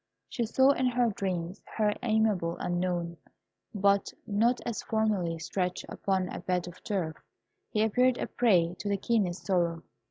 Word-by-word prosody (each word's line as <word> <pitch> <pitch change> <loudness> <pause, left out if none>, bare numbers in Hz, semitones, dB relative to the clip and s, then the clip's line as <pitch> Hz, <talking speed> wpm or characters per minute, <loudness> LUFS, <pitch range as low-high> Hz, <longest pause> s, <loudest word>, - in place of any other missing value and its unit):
She 235 - -2
saw 265 +4 +5
in 260 -2 +1
her 245 -1 +2
dreams 185 -2 -3 0.2
her 210 -1 +3
amiable 215 -7 +1
Unknown, 175 -1 -2 0.5
but 200 -1 +2
not 230 +4 +2
as 235 -2 -2
formerly. 210 -7 0
Stretched 180 +2 -2
upon 190 -2 -1
a - - -5
bed 180 -1 -1
of 175 +1 -11
turf, 175 -7 -2 0.5
he 215 - +1
appeared 250 +3 +3
a - - -2
prey 180 -8 +3
to 205 - -3
the 200 - +1
keenest 195 -4 0
sorrow. 170 -3 +1
195 Hz, 155 wpm, -29 LUFS, 175-220 Hz, 0.5 s, saw